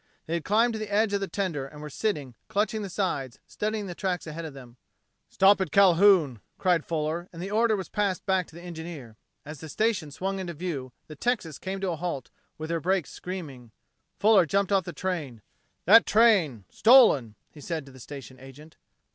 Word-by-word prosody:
They 165 Hz, -, -4 dB
had 170 Hz, -2 st, -1 dB
climbed 225 Hz, +6 st, +2 dB
to 220 Hz, -, -4 dB
the 215 Hz, -1 st, -6 dB
edge 210 Hz, 0 st, +2 dB
of 200 Hz, -, +1 dB
the 195 Hz, -, -3 dB
tender 170 Hz, -10 st, -3 dB
and 150 Hz, +2 st, -13 dB
were 150 Hz, -, -7 dB
sitting, 145 Hz, -, -2 dB
clutching 215 Hz, 0 st, -1 dB
the 200 Hz, -, -5 dB
sides, 155 Hz, -, -2 dB
studying 215 Hz, 0 st, -3 dB
the 180 Hz, -, -6 dB
tracks 180 Hz, -1 st, -3 dB
ahead 160 Hz, +1 st, -6 dB
of 150 Hz, -3 st, -8 dB
them. 125 Hz, -2 st, -13 dB, 0.5 s
"Stop 195 Hz, +1 st, +4 dB
at 185 Hz, -, -1 dB
Calhoun!" 180 Hz, -, +5 dB, 0.2 s
called 175 Hz, -4 st, +2 dB
Fuller, 165 Hz, +2 st, -3 dB
and 165 Hz, -, -11 dB
the 190 Hz, +3 st, -5 dB
order 225 Hz, +1 st, +3 dB
was 190 Hz, -2 st, -5 dB
passed 200 Hz, -4 st, -1 dB
back 190 Hz, -2 st, +1 dB
to 160 Hz, -, -17 dB
the 170 Hz, -, -11 dB
engineer. 160 Hz, -9 st, -8 dB, 0.3 s
As 150 Hz, 0 st, -8 dB
the 160 Hz, -, -9 dB
station 215 Hz, -5 st, 0 dB
swung 190 Hz, +6 st, -3 dB
into 175 Hz, -2 st, -5 dB
view, 145 Hz, -6 st, -5 dB
the 155 Hz, -, -11 dB
Texas 170 Hz, -, -2 dB
came 195 Hz, +1 st, -4 dB
to 190 Hz, -2 st, -1 dB
a 165 Hz, -, -4 dB
halt, 160 Hz, -6 st, -4 dB, 0.3 s
with 155 Hz, +1 st, -5 dB
her 165 Hz, -, 0 dB
brakes 185 Hz, 0 st, 0 dB
screaming. 150 Hz, -10 st, -8 dB, 0.5 s
Fuller 200 Hz, -5 st, +5 dB
jumped 200 Hz, +4 st, 0 dB
off. 195 Hz, -3 st, +2 dB
"That 175 Hz, -, +1 dB
train 195 Hz, -, +3 dB
stolen!" 215 Hz, -, +5 dB, 0.2 s
he 150 Hz, -, -14 dB
said 160 Hz, -1 st, -4 dB
to 135 Hz, -, -14 dB
the 130 Hz, -, -14 dB
station 130 Hz, -1 st, -10 dB
agent. 135 Hz, +4 st, -14 dB
175 Hz, 195 wpm, -27 LUFS, 150-200 Hz, 0.5 s, Calhoun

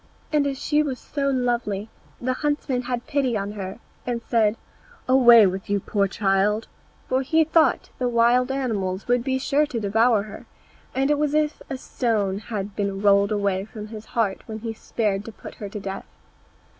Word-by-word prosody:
And 290 Hz, -2 st, +3 dB
as 275 Hz, -1 st, -2 dB
she 300 Hz, 0 st, +2 dB
was 275 Hz, -4 st, -2 dB
so 280 Hz, +1 st, -2 dB
lovely 240 Hz, -6 st, -1 dB, 0.3 s
the 255 Hz, +1 st, -1 dB
huntsman 290 Hz, -2 st, -1 dB
had 245 Hz, -1 st, -3 dB
pity 270 Hz, -6 st, 0 dB
on 200 Hz, 0 st, -3 dB
her, 195 Hz, -2 st, -6 dB, 0.3 s
and 245 Hz, -1 st, -2 dB
said, 225 Hz, -2 st, +2 dB, 0.5 s
"Away 240 Hz, -4 st, +8 dB
with 190 Hz, +1 st, -2 dB
you 205 Hz, -, +2 dB
then, 195 Hz, -, -7 dB
poor 200 Hz, -2 st, +1 dB
child;" 200 Hz, +2 st, +1 dB, 0.4 s
for 260 Hz, +1 st, +1 dB
he 320 Hz, +4 st, +3 dB
thought 320 Hz, +1 st, +2 dB
the 250 Hz, -1 st, +1 dB
wild 240 Hz, +2 st, +3 dB
animals 205 Hz, -8 st, -2 dB
would 245 Hz, 0 st, +2 dB
be 260 Hz, 0 st, 0 dB
sure 290 Hz, +3 st, +1 dB
to 245 Hz, -5 st, -3 dB
devour 220 Hz, +1 st, +3 dB
her, 210 Hz, -, -11 dB, 0.5 s
and 270 Hz, +2 st, +2 dB
it 295 Hz, -, +2 dB
was 300 Hz, 0 st, +1 dB
as 305 Hz, -1 st, +3 dB
if -, -, -27 dB
a 270 Hz, -, -3 dB
stone 215 Hz, -7 st, -1 dB
had 205 Hz, -3 st, -5 dB
been 200 Hz, -1 st, -2 dB
rolled 200 Hz, 0 st, +4 dB
away 200 Hz, -2 st, 0 dB
from 215 Hz, 0 st, -9 dB
his 215 Hz, -1 st, -8 dB
heart 205 Hz, -4 st, +1 dB
when 220 Hz, -1 st, -6 dB
he 225 Hz, -1 st, -4 dB
spared 210 Hz, -3 st, -2 dB
to 225 Hz, -, -7 dB
put -, -, -11 dB
her 205 Hz, -, -4 dB
to 210 Hz, -, -6 dB
death. 195 Hz, 0 st, -6 dB
230 Hz, 195 wpm, -24 LUFS, 205-260 Hz, 0.5 s, Away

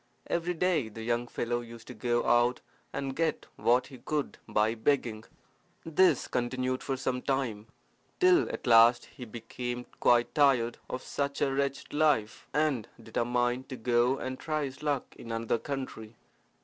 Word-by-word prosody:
Every 175 Hz, +1 st, -1 dB
day 165 Hz, -8 st, +1 dB
the 110 Hz, +1 st, -8 dB
young 120 Hz, +1 st, 0 dB
fellow 120 Hz, 0 st, -2 dB
used 115 Hz, -1 st, -11 dB
to -, -, -6 dB
go 120 Hz, -1 st, 0 dB
out 120 Hz, +1 st, +3 dB, 0.3 s
and 135 Hz, -1 st, -3 dB
get 165 Hz, 0 st, 0 dB
what 125 Hz, +2 st, +3 dB
he 130 Hz, -3 st, -12 dB
could 150 Hz, -2 st, -3 dB
by 105 Hz, +1 st, +2 dB
begging. 115 Hz, -2 st, 0 dB, 0.6 s
This 175 Hz, +4 st, +3 dB
continued 130 Hz, +1 st, -1 dB
for 135 Hz, -1 st, -2 dB
some 130 Hz, -1 st, -2 dB
time, 125 Hz, -6 st, -2 dB, 0.5 s
till 365 Hz, -1 st, +5 dB
at -, -, -6 dB
last 120 Hz, 0 st, +6 dB
he 125 Hz, -, -10 dB
became 120 Hz, +2 st, -5 dB
quite 120 Hz, 0 st, +4 dB
tired 135 Hz, -6 st, +3 dB
of 130 Hz, -, -4 dB
such 140 Hz, 0 st, -2 dB
a 135 Hz, -, +1 dB
wretched 140 Hz, 0 st, -2 dB
life, 145 Hz, -8 st, +1 dB
and 145 Hz, -7 st, +1 dB
determined 120 Hz, +2 st, -1 dB
to 130 Hz, -, -5 dB
go 120 Hz, +2 st, +2 dB
and 130 Hz, 0 st, -5 dB
try 155 Hz, -1 st, -1 dB
his 130 Hz, -1 st, -8 dB
luck 145 Hz, -3 st, -2 dB
in 115 Hz, -, -8 dB
another 115 Hz, 0 st, 0 dB
country. 130 Hz, -6 st, -6 dB
125 Hz, 160 wpm, -30 LUFS, 120-140 Hz, 0.6 s, last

